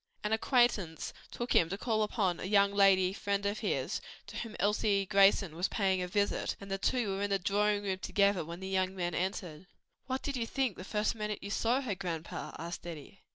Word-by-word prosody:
An 210 +1 0
acquaintance 220 - +1 0.2
took 240 +1 -3
him 165 - +4
to 195 - -3
call 220 0 0
upon 200 -4 0
a - - -5
young 200 0 +4
lady 195 -2 +5
friend 200 -1 -1
of 205 +1 -1
his, - - -1 0.2
to - - -8
whom 225 -2 -5
Elsie 205 -1 +2
Grayson 195 -3 +4
was 175 +3 0
paying 190 -4 +1
a 180 - -2
visit, 200 +2 0
and 195 -1 -9
the 195 - -1
two 245 0 +1
were 195 - -3
in 205 - 0
the 200 - +2
drawing 205 +2 +1
room 190 -2 -2
together 200 0 +2
when 170 +3 -8
the 190 - -5
young 190 0 0
men 175 -2 -2
entered. 180 -2 -3 0.4
"What 260 0 -2
did 280 - -2
you 230 -1 -2
think 260 -5 0
the - - -8
first 210 +2 0
minute 210 -2 -4
you 200 - -5
saw 240 +5 +1
her, 245 -7 -2
grandpa?" 170 -3 -5
asked 170 +1 -6
Eddie. 165 +3 -9
200 Hz, 215 wpm, -32 LUFS, 185-210 Hz, 0.4 s, lady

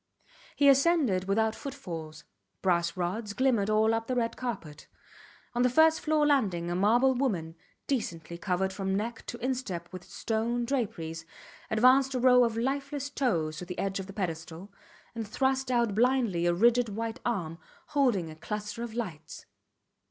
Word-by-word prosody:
He 285 - +4
ascended 275 - +4
without 220 +3 +1
footfalls. 165 - -7 0.4
Brass 170 -1 +1
rods 200 +4 -2
glimmered 230 -3 +2
all 215 +1 +3
up 225 0 -2
the 255 - -1
red 230 -2 0
carpet. 185 -12 -6 0.7
On 240 - 0
the 250 - +4
first 315 +5 +5
floor 305 -1 +2
landing 195 -13 +1
a - - -1
marble 235 +8 +4
woman, 200 -12 -1 0.3
decently 170 - -3
covered 190 +1 -1
from 190 0 -2
neck 225 +3 -3
to 240 - -5
instep 210 -10 -3
with 185 -1 -7
stone 235 +2 -2
draperies, 170 -11 -3 0.5
advanced 260 +4 +4
a - - +1
row 250 0 +6
of 230 -1 0
lifeless 280 +3 -2
toes 165 - 0
to 180 - -6
the 180 0 -7
edge 195 0 -2
of 190 - -6
the 195 - -9
pedestal, 170 0 -5 0.4
and 225 -2 -5
thrust 265 +3 0
out 235 -4 +2
blindly 230 -6 +2
a 175 - +3
rigid 235 +4 +4
white 225 +2 -4
arm 175 -9 -2 0.3
holding 235 - +1
a - - -10
cluster 210 +6 -5
of 235 -2 -5
lights. 165 -10 -6
220 Hz, 160 wpm, -29 LUFS, 180-255 Hz, 0.7 s, row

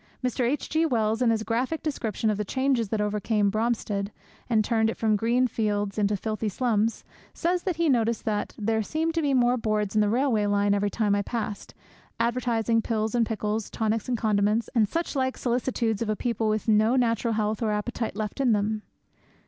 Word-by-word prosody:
Mr. 250 -1 0
H. 290 - -2
G. 315 +1 +1
Wells, 225 -6 +1
in 245 - +4
his 220 -1 +1
graphic 250 +8 -1
description 225 -7 -1
of 210 - -2
the - - +1
changes 260 0 0
that 215 0 -1
overcame 210 0 +1
Bromstead, 215 -2 -1 0.4
and 220 -3 +3
turned 220 -2 +2
it - - -4
from 220 -1 +2
green 235 +4 +2
fields 210 -3 -1
into 205 0 +1
filthy 215 +1 -2
slums, 225 0 0 0.3
says 355 +1 0
that 370 -2 -2
he 335 +1 +1
noticed 235 -4 +1
that 210 -2 -2
'there 220 +1 0
seemed 320 +8 -1
to 330 - 0
be 280 -3 +1
more 245 0 +3
boards 215 -3 -1
by 215 - +3
the 210 - +2
railway 230 -3 +2 0.3
every 205 0 +1
time 210 -1 0
I 200 - +2
passed, 210 -1 -5 0.4
advertising 235 -1 +1
pills 220 -1 -1
and 235 -2 +2
pickles, 215 -1 -2
tonics 220 +1 -1
and 245 - +1
condiments, 215 +1 +1
and 220 -5 +3
such 335 -2 -2
like 260 -1 0
solicitudes 235 -3 -1
of 230 - -1
a 215 - +1
people 230 -1 -1
with 215 +1 -1
no 220 +3 +4
natural 230 -2 +1
health 215 0 -1
or 225 - +1
appetite 215 +2 -2
left 215 +2 -4
in 250 -4 +4
them.' 210 +1 0
225 Hz, 195 wpm, -26 LUFS, 210-245 Hz, 0.4 s, in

